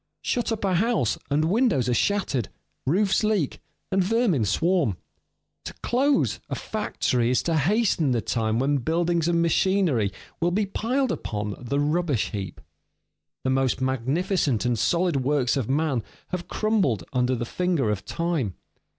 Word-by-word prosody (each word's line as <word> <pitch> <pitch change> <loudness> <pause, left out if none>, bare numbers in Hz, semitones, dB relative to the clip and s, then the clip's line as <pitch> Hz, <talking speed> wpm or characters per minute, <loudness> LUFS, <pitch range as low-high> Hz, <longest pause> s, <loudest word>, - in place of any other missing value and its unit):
Shut 240 -1 -1
up 220 -2 -2
a 190 - +1
house, 195 - +1
and 150 +2 +2
windows 200 - +2
are 125 - +2
shattered, 140 - 0 0.4
roofs 190 +7 +2
leak, 210 -9 0 0.3
and 190 0 +3
vermin 200 - +2
swarm. 160 - +1 0.7
To - - -7
close 270 +3 +2
a - - -2
factory 125 - -1
is 125 - +2
to 165 - 0
hasten 175 - +2
the 120 -2 +2
time 110 -1 -1
when 140 +3 +2
buildings 165 +4 0
and 170 -1 +2
machinery 170 - +2 0.3
will 170 - +2
be 205 +4 +1
piled 250 +7 -1
upon 105 -1 -3
the 135 +3 -2
rubbish 150 -4 0
heap. 95 -5 -5 0.8
The 130 - +1
most 130 -1 +1
magnificent 135 - 0
and 120 -2 +1
solid 170 - +2
works 135 -1 +1
of 130 -5 -2
man 140 -3 +1 0.3
have 180 -1 -4
crumbled 195 - +1
under 125 0 +1
the 120 - -3
finger 165 -6 0
of 100 -2 -3
time. 165 - -2
155 Hz, 150 wpm, -25 LUFS, 125-190 Hz, 0.8 s, and